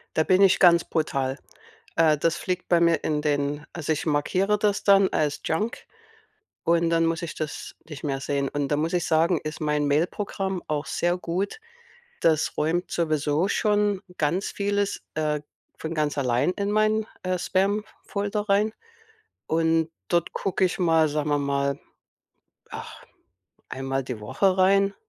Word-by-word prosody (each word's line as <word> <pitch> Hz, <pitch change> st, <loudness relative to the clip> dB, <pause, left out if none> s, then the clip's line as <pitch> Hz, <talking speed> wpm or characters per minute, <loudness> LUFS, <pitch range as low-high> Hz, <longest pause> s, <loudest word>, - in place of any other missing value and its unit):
Da 160 Hz, -, +3 dB
bin 185 Hz, +1 st, +4 dB
ich 195 Hz, -, +5 dB
ganz 170 Hz, -2 st, +6 dB
brutal. 135 Hz, -4 st, -1 dB, 0.6 s
Äh. 160 Hz, -2 st, +4 dB
Das 165 Hz, +2 st, +1 dB
fliegt 180 Hz, 0 st, -3 dB
bei 175 Hz, -1 st, +4 dB
mir 170 Hz, 0 st, +4 dB
in 150 Hz, -1 st, 0 dB
den 145 Hz, 0 st, -1 dB
also, 160 Hz, -2 st, -2 dB
ich 155 Hz, -, -3 dB
markiere 185 Hz, +8 st, +1 dB
das 205 Hz, -1 st, 0 dB
dann 195 Hz, -1 st, +6 dB
als 150 Hz, -2 st, -1 dB
Junk 210 Hz, +9 st, -2 dB, 0.8 s
und 170 Hz, 0 st, +2 dB
dann 165 Hz, 0 st, +3 dB
muss 165 Hz, 0 st, -1 dB
ich 165 Hz, -2 st, -5 dB
das 155 Hz, -1 st, -5 dB
nicht 150 Hz, -2 st, -9 dB
mehr 135 Hz, -2 st, -2 dB
sehen. 140 Hz, 0 st, -1 dB
Und 145 Hz, -1 st, -2 dB
da 145 Hz, -, +1 dB
muss 160 Hz, +3 st, -1 dB
ich 175 Hz, -2 st, 0 dB
sagen, 165 Hz, +1 st, +2 dB
ist 155 Hz, +2 st, -6 dB
mein 150 Hz, -1 st, 0 dB
Mailprogramm 190 Hz, +5 st, -1 dB
auch 150 Hz, -1 st, -2 dB
sehr 175 Hz, +1 st, 0 dB
gut. 185 Hz, -, -3 dB, 0.6 s
Das 160 Hz, -2 st, +2 dB
räumt 165 Hz, +4 st, 0 dB
sowieso 155 Hz, +1 st, 0 dB
schon 205 Hz, -2 st, +1 dB, 0.2 s
ganz 165 Hz, +6 st, 0 dB
vieles, 200 Hz, 0 st, -1 dB
äh, 150 Hz, -1 st, 0 dB, 0.4 s
von 160 Hz, +1 st, -5 dB
ganz 150 Hz, -1 st, 0 dB
allein 125 Hz, +4 st, +2 dB
in 200 Hz, +1 st, -2 dB
mein, 215 Hz, +1 st, +2 dB, 0.2 s
äh, 185 Hz, 0 st, 0 dB
Spamfolder 205 Hz, +2 st, -2 dB
rein. 205 Hz, +2 st, +3 dB, 0.7 s
Und 165 Hz, 0 st, +1 dB, 0.2 s
dort 170 Hz, -1 st, +1 dB
gucke 190 Hz, 0 st, 0 dB
ich 180 Hz, -, 0 dB
mal, 165 Hz, -3 st, +3 dB
sagen 150 Hz, 0 st, -2 dB
wir 145 Hz, -, +2 dB
mal, 140 Hz, 0 st, 0 dB, 0.9 s
ach, -, -, -9 dB, 0.6 s
einmal 135 Hz, 0 st, -2 dB
die 125 Hz, -4 st, -6 dB
Woche 185 Hz, -, +1 dB
rein, 195 Hz, +1 st, +4 dB
165 Hz, 160 wpm, -25 LUFS, 150-195 Hz, 0.9 s, ganz